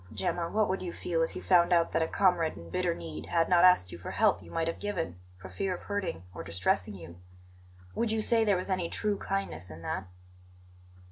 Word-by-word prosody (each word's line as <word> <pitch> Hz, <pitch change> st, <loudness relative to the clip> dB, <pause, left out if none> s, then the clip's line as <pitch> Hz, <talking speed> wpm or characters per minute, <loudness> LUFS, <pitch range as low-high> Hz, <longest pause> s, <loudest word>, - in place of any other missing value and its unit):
"Gemma, 170 Hz, -2 st, -2 dB
what 215 Hz, 0 st, +2 dB
would 190 Hz, -, -1 dB
you 180 Hz, -, -4 dB
feel 165 Hz, -2 st, -1 dB
if 165 Hz, -, -1 dB
you -, -, -6 dB
found 175 Hz, -1 st, +4 dB
out 170 Hz, -1 st, +3 dB
that 165 Hz, -, +1 dB
a 160 Hz, -, +1 dB
comrade 180 Hz, -5 st, +2 dB
in 85 Hz, 0 st, -11 dB
bitter 180 Hz, -2 st, 0 dB
need 80 Hz, -1 st, -7 dB
had 165 Hz, -, +2 dB
not 175 Hz, -1 st, +5 dB
asked 180 Hz, -, +6 dB
you 85 Hz, -, -8 dB
for -, -, -7 dB
help 85 Hz, -, +2 dB
you 85 Hz, -, -13 dB
might 165 Hz, -, -1 dB
have 165 Hz, -, -3 dB
given, 170 Hz, -, -3 dB, 0.2 s
for 90 Hz, +1 st, -10 dB
fear 180 Hz, -, -2 dB
of -, -, -11 dB
hurting 200 Hz, -, -3 dB
or 80 Hz, -, -6 dB
distressing 90 Hz, +3 st, 0 dB
you? 85 Hz, -1 st, -11 dB, 0.8 s
Would 230 Hz, -1 st, 0 dB
you 220 Hz, -, +1 dB
say 230 Hz, 0 st, +3 dB
there 205 Hz, -3 st, +3 dB
was 185 Hz, +2 st, -3 dB
any 180 Hz, -3 st, 0 dB
true 210 Hz, -1 st, 0 dB
kindness 90 Hz, -3 st, -3 dB
in 80 Hz, +1 st, -10 dB
that?" 95 Hz, -, -3 dB
165 Hz, 225 wpm, -30 LUFS, -, 0.8 s, asked